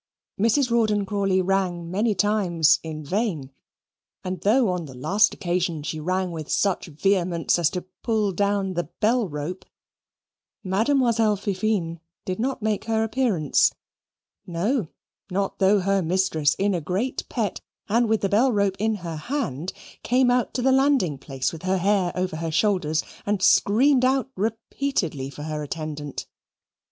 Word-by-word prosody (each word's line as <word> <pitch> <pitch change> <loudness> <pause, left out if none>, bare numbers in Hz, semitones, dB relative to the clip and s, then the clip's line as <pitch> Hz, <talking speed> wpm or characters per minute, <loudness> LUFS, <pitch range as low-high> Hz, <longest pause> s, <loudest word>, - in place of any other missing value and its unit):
Mrs. 235 +4 +2
Rawdon 215 -3 +2
Crawley 195 -2 +1
rang 180 -3 -1
many 210 +3 +1
times 185 -5 +3
in 155 -1 -6
vain; 175 - -2 0.7
and 185 -2 -4
though, 225 +3 +3
on 180 -2 -2
the 135 -3 -11
last 200 +12 +3
occasion, 175 -4 -2
she 155 +1 -4
rang 185 +3 -1
with 160 -3 -6
such 195 -3 +1
vehemence 175 +1 +1
as 165 -4 +3
to 180 - -5 0.2
pull 215 -4 +1
down 200 0 0
the 175 -1 -2
bell 225 +1 +2
rope, 150 +5 -5 1.0
Mademoiselle 225 +2 +2
Fifine 195 -4 -1 0.3
did 185 +1 -3
not 255 -1 -2
make 215 -1 -1
her 220 -1 +1
appearance 220 - +2 0.7
no, 190 - 0 0.4
not 195 +1 -2
though 195 +1 +4
her 195 +1 +1
mistress, 165 -4 +1
in 200 +1 +1
a 175 - -1
great 190 - -2
pet, 220 -5 -2 0.3
and 230 +2 +2
with 220 -1 +2
the 195 - 0
bell 235 +7 +3
rope 200 -3 +1
in 220 +1 +1
her 165 -2 -4
hand, 180 - -3 0.3
came 250 0 +3
out 245 -1 +1
to 250 - -1
the 265 - +4
landing 265 - +2
place 135 0 -3
with 160 - -8
her 185 +1 0
hair 190 -1 +2
over 180 -3 -2
her 165 0 -3
shoulders 165 -3 +1 0.2
and 205 -2 0
screamed 255 +9 +4
out 265 0 +1
repeatedly 220 - -2
for 145 +2 -9
her 155 -1 -4
attendant. 150 -1 -5
195 Hz, 155 wpm, -24 LUFS, 170-220 Hz, 1.0 s, though